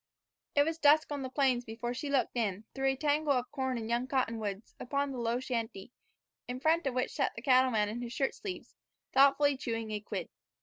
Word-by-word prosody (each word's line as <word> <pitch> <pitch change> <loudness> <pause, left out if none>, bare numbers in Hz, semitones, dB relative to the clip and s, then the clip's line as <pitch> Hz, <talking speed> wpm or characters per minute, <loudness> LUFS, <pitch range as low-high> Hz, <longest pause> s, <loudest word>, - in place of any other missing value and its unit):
It 285 - +6
was 325 +2 -2
dusk 300 0 +5
on 285 -1 -2
the 260 - -4
plains 260 -2 +2
before 235 +1 -4
she 285 +4 -4
looked 275 -3 +1
in, 210 -4 -1
through 270 0 0
a 265 - +2
tangle 295 +1 +2
of 250 -1 -1
corn 260 -3 -1
and 225 -1 -4
young 240 +2 0
cottonwoods, 225 -6 -2
upon 280 +2 -1
the 260 - -5
low 235 +1 0
shanty, 230 -4 -4 0.6
in 250 +1 -4
front 320 +2 +2
of 255 - -2
which 255 - 0
sat 275 - -1
the 235 - -7
cattleman 255 -5 +4
in 225 +4 -4
his 240 -1 -5
shirt 270 +2 0
sleeves, 380 -3 -7 0.4
thoughtfully 280 +1 +5
chewing 225 -4 -3
a 210 - -2
quid. 210 - -5
255 Hz, 210 wpm, -31 LUFS, 235-280 Hz, 0.6 s, It